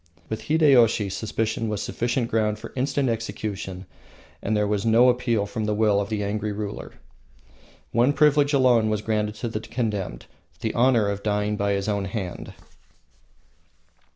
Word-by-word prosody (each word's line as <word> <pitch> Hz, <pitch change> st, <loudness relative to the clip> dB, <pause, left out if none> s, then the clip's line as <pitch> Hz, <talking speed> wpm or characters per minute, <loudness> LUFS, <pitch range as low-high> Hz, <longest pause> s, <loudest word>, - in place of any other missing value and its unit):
With 110 Hz, -, -5 dB
Hideyoshi 130 Hz, -9 st, +4 dB
suspicion 110 Hz, +2 st, -2 dB
was 105 Hz, -2 st, -2 dB
sufficient 120 Hz, +2 st, -1 dB
ground 105 Hz, -1 st, +1 dB
for -, -, -10 dB
instant 135 Hz, +1 st, 0 dB
execution, 100 Hz, -4 st, -4 dB, 0.6 s
and 110 Hz, +1 st, 0 dB
there 105 Hz, 0 st, +1 dB
was 100 Hz, -1 st, 0 dB
no 115 Hz, +2 st, +5 dB
appeal 120 Hz, -4 st, +1 dB
from 110 Hz, +1 st, -4 dB
the 105 Hz, 0 st, 0 dB
will 105 Hz, -2 st, +3 dB
of 100 Hz, -, -5 dB
the 105 Hz, -2 st, -2 dB
angry 105 Hz, +1 st, -2 dB
ruler. 105 Hz, 0 st, -6 dB, 1.0 s
One 120 Hz, +4 st, +3 dB
privilege 150 Hz, -1 st, +3 dB
alone 125 Hz, -6 st, +4 dB
was 105 Hz, -1 st, -1 dB
granted 105 Hz, -1 st, -1 dB
to 120 Hz, -, -4 dB
the 110 Hz, -1 st, -3 dB
condemned 105 Hz, -, -3 dB, 0.4 s
the -, -, -2 dB
honor 120 Hz, -3 st, +3 dB
of 100 Hz, 0 st, -2 dB
dying 105 Hz, 0 st, 0 dB
by 100 Hz, 0 st, 0 dB
his 100 Hz, 0 st, -2 dB
own 100 Hz, -2 st, -1 dB
hand. 95 Hz, -2 st, -6 dB
110 Hz, 155 wpm, -24 LUFS, 105-120 Hz, 1.0 s, no